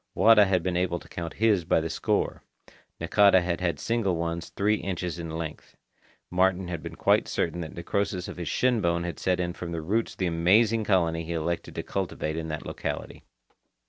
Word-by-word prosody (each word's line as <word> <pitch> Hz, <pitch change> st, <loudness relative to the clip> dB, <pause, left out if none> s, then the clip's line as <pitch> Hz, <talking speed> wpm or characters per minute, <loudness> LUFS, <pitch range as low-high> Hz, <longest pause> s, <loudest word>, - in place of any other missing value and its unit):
Wada 110 Hz, -2 st, +7 dB
had 95 Hz, -3 st, +1 dB
been 90 Hz, -1 st, -1 dB
able 90 Hz, -1 st, 0 dB
to -, -, -13 dB
count 85 Hz, -1 st, -6 dB
his 105 Hz, -4 st, +3 dB
by 80 Hz, -, +2 dB
the 80 Hz, -, -2 dB
score. 80 Hz, -, -1 dB, 0.6 s
Nakata 100 Hz, -2 st, +5 dB
had 85 Hz, 0 st, -2 dB
had 85 Hz, -5 st, -1 dB
single 115 Hz, -6 st, 0 dB
ones 85 Hz, 0 st, -3 dB
three 105 Hz, +2 st, +1 dB
inches 90 Hz, -3 st, -4 dB
in 85 Hz, -1 st, -5 dB
length. 80 Hz, -1 st, -6 dB, 0.5 s
Martin 90 Hz, 0 st, +2 dB
had 85 Hz, -3 st, -4 dB
been -, -, -7 dB
quite -, -, +3 dB
certain 85 Hz, +1 st, -1 dB
that 80 Hz, -, -7 dB
necrosis 90 Hz, +1 st, -2 dB
of -, -, -8 dB
his 85 Hz, -2 st, -5 dB
shinbone 85 Hz, -5 st, +1 dB
had 85 Hz, -3 st, -5 dB
set 90 Hz, -1 st, +1 dB
in 90 Hz, -1 st, -1 dB
from 85 Hz, -1 st, -6 dB
the 85 Hz, -1 st, -3 dB
roots 110 Hz, +7 st, 0 dB
of -, -, -20 dB
the 95 Hz, -, 0 dB
amazing 105 Hz, +7 st, +3 dB
colony 85 Hz, -5 st, +1 dB
he 85 Hz, +1 st, -4 dB
elected 85 Hz, +1 st, -3 dB
to -, -, -3 dB
cultivate 85 Hz, -5 st, -3 dB
in 80 Hz, 0 st, -4 dB
that 75 Hz, -1 st, -5 dB
locality. -, -, -5 dB
90 Hz, 200 wpm, -27 LUFS, 85-95 Hz, 0.6 s, Wada